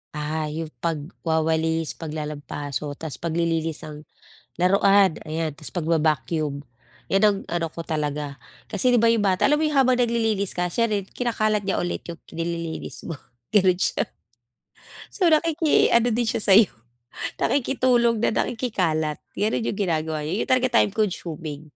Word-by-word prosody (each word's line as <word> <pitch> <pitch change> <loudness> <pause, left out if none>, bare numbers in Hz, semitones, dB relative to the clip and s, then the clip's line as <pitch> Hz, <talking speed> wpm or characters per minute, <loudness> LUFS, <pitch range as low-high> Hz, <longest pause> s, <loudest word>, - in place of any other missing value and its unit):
Ah, 150 +1 -2
'yong 155 +1 -5
pagwawalis, 160 0 -1
paglalampaso 150 -2 -5
tapos 160 -2 -6
paglilinis 165 -1 -1
ng 150 0 -9 0.5
laruan, 195 -1 +4
ayan. 160 0 -2
Tapos 155 - -7
pagba-vacuum, 155 -3 0 0.5
iyan 195 +2 +2
ang 205 -1 +5
ano 170 -1 0
ko 165 - -7
talaga 150 -3 -3 0.3
kasi 255 - +2
'di 240 - +4
ba, 230 - +4
'yong 225 -3 +3
bata 190 +5 +3
alam 295 - +4
mo 315 - +1
'yong 300 - -1
habang 255 -1 +4
naglililis 225 -5 +1
ka 180 0 0
siya 230 +5 +2
rin 205 -1 +1
kinakalat 215 -4 0
niya 195 - 0
ulit 175 - -3
'yong 170 -1 -8 0.2
nililinis 170 0 -4
mo, 165 - -4 0.3
ganon 185 -3 +3
siya. - - +1 1.1
So, 375 - 0
nakiki 320 -1 +3
ano 235 +1 +4
din 240 +1 +1
siya 220 - 0
sa'yo, 205 0 +6 0.7
nakikitulong 245 -3 +2
na 220 - +2
nakikikalat. 170 - -1 0.2
Ganon 215 +2 +1
'yong 215 - -2
ginagawa 160 -5 -1
niya, 155 - -2
'yun - - -9
talaga 255 -2 +4
time 205 - +1
consuming 165 -8 -3
170 Hz, 150 wpm, -24 LUFS, 155-220 Hz, 1.1 s, sa'yo